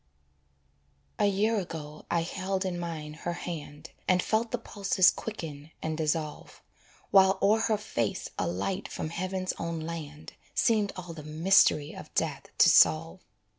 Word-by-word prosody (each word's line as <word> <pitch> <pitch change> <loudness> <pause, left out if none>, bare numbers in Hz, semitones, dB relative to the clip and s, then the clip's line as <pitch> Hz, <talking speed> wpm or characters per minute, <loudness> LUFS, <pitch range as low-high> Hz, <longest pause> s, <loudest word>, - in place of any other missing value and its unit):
A - - +4
year 210 +3 +2
ago 155 -4 -7
I 170 - +2
held 190 +2 -2
in 180 -2 -2
mine 160 -3 -5
her 170 +2 -4
hand, 165 -3 -7 0.2
And 185 -1 +3
felt 225 +1 +1
the 245 - -1
pulses 200 -4 +3
quicken 160 -9 -7
and 160 0 -3
dissolve, 155 -1 -3 0.5
While 190 0 +6
o'er 210 +3 +4
her 220 -1 +1
face 120 - -2
a - - 0
light 100 - -2
from 155 - -5
heaven's 185 +2 -2
own 170 -1 -3
land 155 -2 -7 0.2
Seemed 215 -3 +2
all 180 -2 -7
the 160 - -8
mystery 155 -1 +3
of - - -10
death - - -1
to - - +7
solve. 165 +4 +5
170 Hz, 150 wpm, -29 LUFS, 155-195 Hz, 0.5 s, to